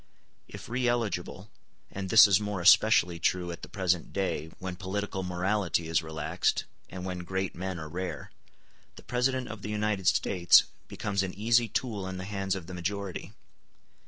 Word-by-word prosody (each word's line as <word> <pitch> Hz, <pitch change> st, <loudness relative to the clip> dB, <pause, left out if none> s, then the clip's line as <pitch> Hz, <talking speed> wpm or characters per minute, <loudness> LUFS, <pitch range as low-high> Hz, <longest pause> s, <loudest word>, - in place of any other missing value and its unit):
If -, -, -10 dB
re 125 Hz, +1 st, -1 dB
eligible 105 Hz, -4 st, -2 dB, 0.4 s
(and 95 Hz, -1 st, -5 dB
this 110 Hz, 0 st, +9 dB
is 100 Hz, -2 st, +4 dB
more 105 Hz, -2 st, -3 dB
especially 90 Hz, -1 st, +5 dB
true 90 Hz, 0 st, 0 dB
at 85 Hz, -, -8 dB
the -, -, -9 dB
present 90 Hz, -3 st, -1 dB
day, 95 Hz, -5 st, -2 dB
when 95 Hz, -1 st, -5 dB
political 95 Hz, +1 st, -3 dB
morality 90 Hz, -2 st, -1 dB
is 80 Hz, +1 st, +1 dB
relaxed, 80 Hz, -1 st, -1 dB, 0.3 s
and 90 Hz, 0 st, -7 dB
when 90 Hz, -1 st, -4 dB
great 95 Hz, +1 st, -3 dB
men 95 Hz, +1 st, -4 dB
are 80 Hz, -1 st, -6 dB
rare), 90 Hz, +4 st, -5 dB, 0.6 s
the -, -, -13 dB
President 125 Hz, +1 st, 0 dB
of 110 Hz, -2 st, -8 dB
the 105 Hz, -, -6 dB
United 105 Hz, -3 st, -1 dB
States 85 Hz, +1 st, +5 dB, 0.2 s
becomes 100 Hz, -2 st, -2 dB
an 95 Hz, -2 st, -4 dB
easy 115 Hz, +3 st, +3 dB
tool 110 Hz, -3 st, -3 dB
in 95 Hz, 0 st, -5 dB
the 95 Hz, -, -6 dB
hands 95 Hz, -1 st, -2 dB
of 95 Hz, -4 st, -6 dB
the 90 Hz, -, -9 dB
majority. 95 Hz, +2 st, -4 dB
95 Hz, 170 wpm, -29 LUFS, 90-105 Hz, 0.6 s, this